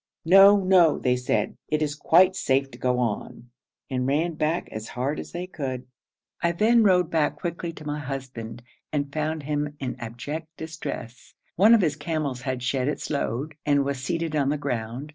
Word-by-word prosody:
'No, 195 Hz, +3 st, +7 dB
no,' 180 Hz, -4 st, +5 dB
they 125 Hz, -1 st, +1 dB
said, 125 Hz, 0 st, -1 dB
'it 155 Hz, -, +1 dB
is 150 Hz, -1 st, -1 dB
quite 180 Hz, +5 st, +4 dB
safe 135 Hz, 0 st, +1 dB
to 120 Hz, -, -12 dB
go 125 Hz, -1 st, +1 dB
on,' 120 Hz, 0 st, -3 dB, 0.4 s
and 125 Hz, -1 st, -1 dB
ran 160 Hz, +5 st, +1 dB
back 155 Hz, +2 st, -1 dB
as 110 Hz, +1 st, -6 dB
hard 135 Hz, +4 st, -2 dB
as -, -, -8 dB
they 175 Hz, +1 st, -4 dB
could. 130 Hz, -8 st, -5 dB, 0.6 s
I 170 Hz, 0 st, +2 dB
then 225 Hz, +6 st, +4 dB
rode 180 Hz, -5 st, +3 dB
back 160 Hz, -2 st, +1 dB
quickly 170 Hz, -1 st, -4 dB
to 155 Hz, -, -11 dB
my 150 Hz, 0 st, -3 dB
husband, 130 Hz, -5 st, -6 dB, 0.3 s
and 145 Hz, -1 st, -2 dB
found 155 Hz, 0 st, -2 dB
him 150 Hz, 0 st, -2 dB
in 130 Hz, -2 st, -3 dB
abject 120 Hz, +8 st, -6 dB
distress; 160 Hz, -6 st, -7 dB, 0.2 s
one 215 Hz, +6 st, +7 dB
of 225 Hz, -, +3 dB
his 155 Hz, -5 st, +1 dB
camels 145 Hz, -4 st, -3 dB
had 130 Hz, -2 st, -3 dB
shed 130 Hz, 0 st, 0 dB
its 150 Hz, -, -3 dB
load, 140 Hz, +1 st, -2 dB
and 145 Hz, -1 st, +2 dB
was 140 Hz, -1 st, -2 dB
seated 165 Hz, +1 st, -2 dB
on 140 Hz, -2 st, +2 dB
the 150 Hz, -, 0 dB
ground. 125 Hz, 0 st, -4 dB
145 Hz, 185 wpm, -25 LUFS, 130-165 Hz, 0.6 s, No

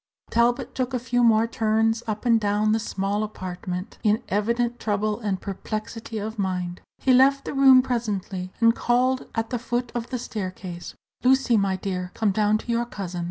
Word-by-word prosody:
Talbot 240 Hz, +2 st, +1 dB
took 255 Hz, 0 st, -2 dB
a -, -, 0 dB
few 245 Hz, 0 st, 0 dB
more 225 Hz, -1 st, +5 dB
turns 225 Hz, 0 st, +1 dB
up 215 Hz, +2 st, -3 dB
and 230 Hz, -2 st, +5 dB
down 210 Hz, +1 st, +1 dB
the 220 Hz, -, +2 dB
small 200 Hz, -1 st, -2 dB
apartment, 185 Hz, -3 st, -5 dB
in 215 Hz, +3 st, +2 dB
evident 235 Hz, +4 st, 0 dB
trouble 210 Hz, 0 st, -1 dB
and 205 Hz, -5 st, -2 dB
perplexity 215 Hz, +3 st, -5 dB
of 215 Hz, +1 st, -5 dB
mind. 180 Hz, -2 st, -2 dB, 0.2 s
He 260 Hz, -, +2 dB
left 275 Hz, +2 st, +5 dB
the -, -, -4 dB
room 265 Hz, -2 st, +7 dB
presently, 200 Hz, -7 st, -3 dB
and 230 Hz, 0 st, +5 dB
called 255 Hz, +2 st, +1 dB
at 225 Hz, +1 st, -2 dB
the 245 Hz, -, -1 dB
foot 245 Hz, 0 st, -2 dB
of 240 Hz, -1 st, -4 dB
the 255 Hz, -, -2 dB
staircase: 185 Hz, -6 st, -6 dB, 0.3 s
"Lucy, 260 Hz, -1 st, +4 dB
my 200 Hz, -2 st, +2 dB
dear, 180 Hz, -1 st, -4 dB
come 215 Hz, -3 st, +1 dB
down 210 Hz, +1 st, +2 dB
to 235 Hz, -, -5 dB
your 235 Hz, 0 st, +1 dB
cousin." 185 Hz, -6 st, -5 dB
220 Hz, 180 wpm, -24 LUFS, 200-240 Hz, 0.3 s, room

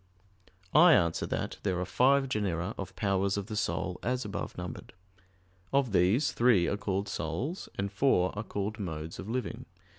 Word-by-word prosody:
I 170 Hz, +3 st, +8 dB
answer 85 Hz, -, +2 dB
that, -, -, -3 dB
There 95 Hz, -3 st, -1 dB
are 90 Hz, -, -1 dB
five 135 Hz, +8 st, +3 dB
genera 100 Hz, -5 st, -1 dB
of 95 Hz, -, -7 dB
powers 100 Hz, -1 st, +1 dB
of 100 Hz, -, -2 dB
the 110 Hz, 0 st, -6 dB
soul, 90 Hz, -2 st, -2 dB
as 125 Hz, 0 st, -1 dB
above 105 Hz, -, -5 dB
numbered. 90 Hz, -1 st, -7 dB, 0.8 s
Of 135 Hz, -4 st, +2 dB
these, 100 Hz, -, +3 dB
three 115 Hz, -7 st, +4 dB
are -, -, 0 dB
called 100 Hz, 0 st, -2 dB
souls, 155 Hz, -, -3 dB
and 100 Hz, 0 st, -2 dB
four 95 Hz, -5 st, +2 dB
are 105 Hz, -, -2 dB
called 105 Hz, +1 st, -4 dB
modes 80 Hz, -4 st, -5 dB
of 95 Hz, -, -6 dB
living. 125 Hz, -1 st, -3 dB
100 Hz, 170 wpm, -30 LUFS, 90-125 Hz, 0.8 s, I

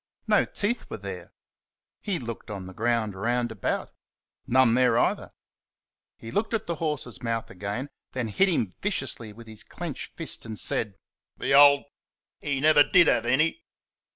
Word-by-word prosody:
No -, -, +3 dB
teeth 225 Hz, +4 st, -2 dB
were -, -, -5 dB
there. -, -, -8 dB, 0.7 s
He 200 Hz, -4 st, -2 dB
looked 115 Hz, -7 st, -7 dB
on 100 Hz, -3 st, -6 dB
the 95 Hz, -, -9 dB
ground 115 Hz, -1 st, 0 dB
round 120 Hz, +4 st, -1 dB
about 105 Hz, -4 st, -3 dB, 0.6 s
none 130 Hz, -2 st, +4 dB
there 125 Hz, -1 st, +3 dB
either. -, -, +1 dB, 0.9 s
He 115 Hz, -, -9 dB
looked 220 Hz, +2 st, 0 dB
at 220 Hz, -, -3 dB
the 170 Hz, -1 st, -3 dB
horse's 150 Hz, -, -3 dB
mouth 115 Hz, -1 st, -3 dB
again, 100 Hz, +8 st, -4 dB, 0.3 s
then 120 Hz, -3 st, -2 dB
hit 195 Hz, -, +3 dB
him 115 Hz, -, 0 dB
viciously 135 Hz, -, -2 dB
with 115 Hz, +2 st, -13 dB
his 110 Hz, -1 st, -10 dB
clenched -, -, -7 dB
fist -, -, +1 dB
and 110 Hz, -2 st, -6 dB
said, 105 Hz, -3 st, -1 dB, 0.4 s
"The 135 Hz, -, -1 dB
old, 140 Hz, 0 st, +7 dB, 0.6 s
he 140 Hz, -2 st, -2 dB
never 150 Hz, +1 st, +6 dB
DID 175 Hz, +4 st, +6 dB
have 120 Hz, -6 st, +2 dB
any!" 155 Hz, -, +1 dB
120 Hz, 160 wpm, -26 LUFS, 110-150 Hz, 0.9 s, old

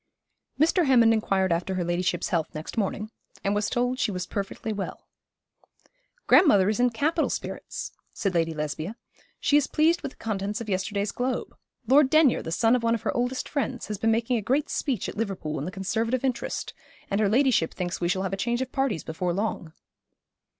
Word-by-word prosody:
Mr. 330 Hz, +2 st, +3 dB
Hammond 235 Hz, -4 st, +6 dB
inquired 195 Hz, -4 st, +1 dB
after 180 Hz, +3 st, -2 dB
her 180 Hz, -, 0 dB
ladyship's 175 Hz, 0 st, -1 dB
health 165 Hz, -4 st, -1 dB
next 155 Hz, +1 st, -6 dB
morning, 215 Hz, 0 st, -2 dB, 0.3 s
and 200 Hz, -, +1 dB
was 205 Hz, +1 st, 0 dB
told 250 Hz, +1 st, 0 dB
she -, -, +1 dB
was 180 Hz, -3 st, -3 dB
perfectly 200 Hz, +2 st, -4 dB
well. 200 Hz, -1 st, -5 dB, 1.2 s
'Grandmother 205 Hz, -, +6 dB
is 215 Hz, -, -1 dB
in 245 Hz, 0 st, +4 dB
capital 300 Hz, +8 st, 0 dB
spirits,' -, -, -5 dB, 0.2 s
said 195 Hz, -4 st, -2 dB
Lady 165 Hz, -1 st, +1 dB
Lesbia. 155 Hz, +5 st, -4 dB, 0.4 s
'She 290 Hz, -, +4 dB
is 295 Hz, -, +2 dB
pleased 325 Hz, +3 st, +2 dB
with 275 Hz, -, -5 dB
the -, -, -28 dB
contents 205 Hz, -1 st, -3 dB
of 230 Hz, -, -6 dB
yesterday's 200 Hz, +2 st, -1 dB
Globe. 250 Hz, +2 st, -3 dB, 0.3 s
Lord 270 Hz, +3 st, +5 dB
Denyer, 310 Hz, -4 st, +4 dB
the 160 Hz, -, -6 dB
son 225 Hz, +7 st, +3 dB
of 250 Hz, -, 0 dB
one 230 Hz, 0 st, +2 dB
of 225 Hz, -, -6 dB
her -, -, -1 dB
oldest 245 Hz, +2 st, -1 dB
friends, 265 Hz, -6 st, -3 dB
has 210 Hz, -2 st, -3 dB
been 225 Hz, -, +2 dB
making 230 Hz, +2 st, +1 dB
a -, -, -1 dB
great 265 Hz, +8 st, 0 dB
speech 255 Hz, -9 st, -1 dB
at -, -, -7 dB
Liverpool 190 Hz, -8 st, -3 dB
in 140 Hz, -, -4 dB
the 180 Hz, -, -4 dB
Conservative 225 Hz, +7 st, -1 dB
interest, 255 Hz, -3 st, -2 dB, 0.4 s
and 200 Hz, +2 st, +1 dB
her 205 Hz, -, +3 dB
ladyship 245 Hz, -7 st, +3 dB
thinks 180 Hz, -1 st, -4 dB
we 175 Hz, -, +1 dB
shall 190 Hz, +2 st, 0 dB
have 190 Hz, -1 st, -2 dB
a -, -, -1 dB
change 240 Hz, +5 st, 0 dB
of 260 Hz, -, -9 dB
parties 270 Hz, -11 st, 0 dB
before 175 Hz, +2 st, -2 dB
long.' 195 Hz, -5 st, -2 dB
215 Hz, 200 wpm, -26 LUFS, 185-250 Hz, 1.2 s, Hammond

